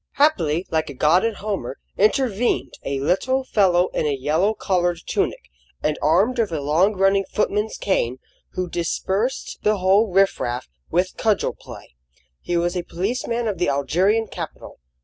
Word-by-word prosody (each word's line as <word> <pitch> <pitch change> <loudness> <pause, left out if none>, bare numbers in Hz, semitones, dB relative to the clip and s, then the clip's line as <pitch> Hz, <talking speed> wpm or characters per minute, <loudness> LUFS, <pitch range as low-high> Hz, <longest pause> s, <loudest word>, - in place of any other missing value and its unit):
Happily, 180 - +2
like 160 -1 0
a 140 - -8
god 155 +7 +3
in 230 -1 0
Homer, 195 - -4 0.2
intervened 215 - +1
a 140 0 -2
little 260 - +1
fellow 185 -7 +3
in 155 - -1
a 140 -2 0
yellow 160 +11 +1
collared 175 -4 0
tunic, - - -2 0.3
and 150 - 0
armed 195 - +2
with 220 -6 +1
a 160 - -2
long 165 +9 +2
running 195 +1 +3
footman's 210 +1 -1
cane, 130 -10 0 0.4
who 185 0 -2
dispersed 190 +8 -2
the 210 0 +2
whole 195 +3 +3
riff 195 +1 +3
raff 120 +1 -3 0.2
with 180 +2 0
cudgel 215 -3 +1
play. - - -13 0.5
He 175 - -2
was 175 +1 0
a 180 - 0
policeman 230 +7 -2
of 200 -5 -3
the 175 - +1
Algerian 180 - +1
capital. - - -8
185 Hz, 160 wpm, -22 LUFS, 160-215 Hz, 0.5 s, god